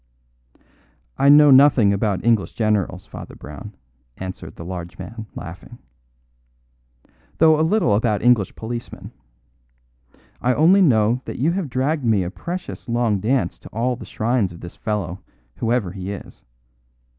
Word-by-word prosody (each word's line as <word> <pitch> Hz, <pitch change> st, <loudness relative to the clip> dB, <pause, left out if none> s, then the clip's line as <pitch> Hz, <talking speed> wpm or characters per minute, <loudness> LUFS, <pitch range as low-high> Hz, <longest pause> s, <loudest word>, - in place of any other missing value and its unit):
"I 140 Hz, -, +5 dB
know 145 Hz, 0 st, +8 dB
nothing 130 Hz, -6 st, +6 dB
about 100 Hz, -1 st, -1 dB
English 115 Hz, -4 st, +2 dB
generals, 105 Hz, -4 st, -1 dB
Father 105 Hz, -, -10 dB
Brown," 75 Hz, +8 st, -10 dB, 0.4 s
answered 95 Hz, 0 st, -7 dB
the 85 Hz, -, -9 dB
large 90 Hz, -1 st, -7 dB
man, 110 Hz, -1 st, -8 dB
laughing, 90 Hz, +8 st, -9 dB, 1.6 s
"though 160 Hz, -1 st, +5 dB
a -, -, +3 dB
little 165 Hz, -, +2 dB
about 105 Hz, 0 st, +1 dB
English 120 Hz, -5 st, +3 dB
policemen. 120 Hz, +1 st, -7 dB, 1.3 s
I 125 Hz, 0 st, +2 dB
only 180 Hz, +6 st, +5 dB
know 120 Hz, -, +3 dB
that -, -, -6 dB
you 150 Hz, +7 st, +1 dB
have 180 Hz, -4 st, -3 dB
dragged 135 Hz, +4 st, -1 dB
me 110 Hz, -5 st, +2 dB
a 90 Hz, -, -4 dB
precious 175 Hz, -, -7 dB
long 115 Hz, -4 st, +1 dB
dance 125 Hz, +6 st, 0 dB
to -, -, -13 dB
all 125 Hz, +3 st, -1 dB
the -, -, -10 dB
shrines 115 Hz, -4 st, -1 dB
of 85 Hz, -, -12 dB
this 85 Hz, -, -9 dB
fellow, 95 Hz, -5 st, -3 dB, 0.4 s
whoever 115 Hz, -5 st, 0 dB
he 95 Hz, +1 st, -6 dB
is. 100 Hz, -, -10 dB
115 Hz, 145 wpm, -21 LUFS, 100-130 Hz, 1.6 s, know